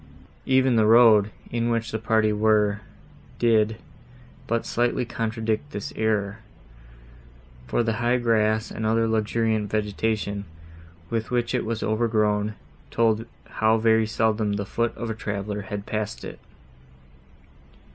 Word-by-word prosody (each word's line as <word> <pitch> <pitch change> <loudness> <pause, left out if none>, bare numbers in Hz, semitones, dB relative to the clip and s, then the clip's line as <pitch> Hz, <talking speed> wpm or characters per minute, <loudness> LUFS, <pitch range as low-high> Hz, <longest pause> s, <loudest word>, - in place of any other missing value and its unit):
Even 130 -2 +3
the 110 -1 +4
road, 110 -3 +6 0.2
in 115 0 0
which 115 -1 -1
the 110 - -2
party 110 -1 +2
were, 105 -1 +2 0.6
did 110 -2 +3 0.7
but 115 0 -1
slightly 120 +1 0
contradict 115 +2 -2
this 105 -5 -6
error, 105 -1 -1 1.3
for 120 - +1
the 115 -1 -1
high 120 +1 +2
grass 110 -2 +1
and 110 - -5
other 115 +1 +2
luxuriant 110 -1 0
vegetation, 105 -1 -2 0.7
with 115 -1 -2
which 120 -1 -1
it - - 0
was 115 0 -3
overgrown, 110 -1 +1 0.3
told 115 0 +1 0.3
how 110 +1 +4
very 110 0 +3
seldom 110 -1 0
the 100 0 -2
foot 115 +3 -2
of 115 -1 -4
a - - -1
traveller 105 -1 -4
had 100 0 -6
passed 110 -1 -4
it. - - -9
110 Hz, 130 wpm, -24 LUFS, 105-115 Hz, 1.3 s, road